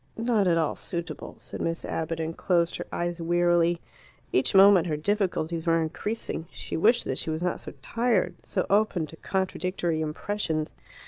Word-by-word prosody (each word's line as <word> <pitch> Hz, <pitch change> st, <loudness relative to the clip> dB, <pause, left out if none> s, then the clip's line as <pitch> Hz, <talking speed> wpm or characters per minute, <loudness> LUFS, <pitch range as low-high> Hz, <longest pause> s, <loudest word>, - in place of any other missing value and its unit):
"Not 225 Hz, -4 st, +2 dB
at 170 Hz, -1 st, +4 dB
all 160 Hz, -2 st, +1 dB
suitable," 170 Hz, -1 st, -5 dB
said -, -, -8 dB
Miss 165 Hz, 0 st, -2 dB
Abbott, 165 Hz, 0 st, -3 dB
and 160 Hz, 0 st, -3 dB
closed 170 Hz, -3 st, +1 dB
her -, -, -6 dB
eyes 175 Hz, 0 st, -2 dB
wearily. 175 Hz, 0 st, +3 dB, 0.5 s
Each 130 Hz, +8 st, +2 dB
moment 195 Hz, -3 st, +7 dB
her 155 Hz, -2 st, -1 dB
difficulties 170 Hz, -2 st, -1 dB
were 165 Hz, 0 st, +4 dB
increasing. 165 Hz, +1 st, -3 dB
She -, -, -6 dB
wished 230 Hz, +8 st, +4 dB
that 130 Hz, -, -1 dB
she -, -, -3 dB
was 160 Hz, +2 st, -2 dB
not 180 Hz, -, 0 dB
so -, -, -8 dB
tired, 230 Hz, -6 st, +1 dB
so -, -, -2 dB
open 200 Hz, -5 st, +2 dB
to 160 Hz, +1 st, -12 dB
contradictory 185 Hz, -3 st, -1 dB
impressions. 155 Hz, 0 st, -2 dB
175 Hz, 170 wpm, -27 LUFS, 160-195 Hz, 0.5 s, moment